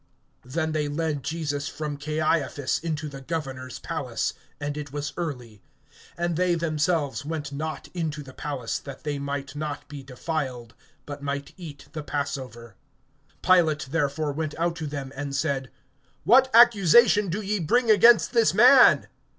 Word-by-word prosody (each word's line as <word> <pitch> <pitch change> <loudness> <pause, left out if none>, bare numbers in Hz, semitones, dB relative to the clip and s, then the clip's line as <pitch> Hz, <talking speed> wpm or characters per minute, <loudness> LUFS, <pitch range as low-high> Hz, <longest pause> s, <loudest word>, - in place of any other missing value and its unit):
(28)Then 160 +4 -2
they 150 -1 0
lead 150 -1 -2
Jesus 145 -2 -3
from 150 -2 -4
Caiaphas 150 -1 -1
into 155 -1 -3
the 140 -2 -9
Governor's 135 -4 -5
palace; 140 -8 -3 0.3
and 145 0 -3
it 150 -2 -6
was 145 0 -4
early; 125 - -6 0.6
and 170 0 -1
they 180 +1 +2
themselves 155 -2 -1
went 150 -1 -4
not 155 +3 -5
into 155 -4 -3
the 130 -1 -13
palace, 135 -6 -4
that 135 -2 -10
they 145 -2 -3
might 140 0 -5
not 150 -1 -5
be 145 -1 -8
defiled, 130 -3 -5 0.3
but 145 -1 -7
might 140 0 -4
eat 155 -6 -10
the 155 - -5
passover. 135 -6 -5 0.7
(29)Pilate 160 -6 +3
therefore 145 +1 -1
went 155 +1 -4
out 170 +1 0
to 160 -2 -5
them, 140 -2 -5
and 140 0 -4
said: 140 -3 -1 0.5
What 260 +3 +5
accusation 215 -2 +6
do 185 +5 -2
ye 210 0 -2
bring 230 +8 +2
against 230 +3 +6
this 230 -5 +3
man? 250 +5 +7
150 Hz, 150 wpm, -25 LUFS, 140-165 Hz, 0.7 s, man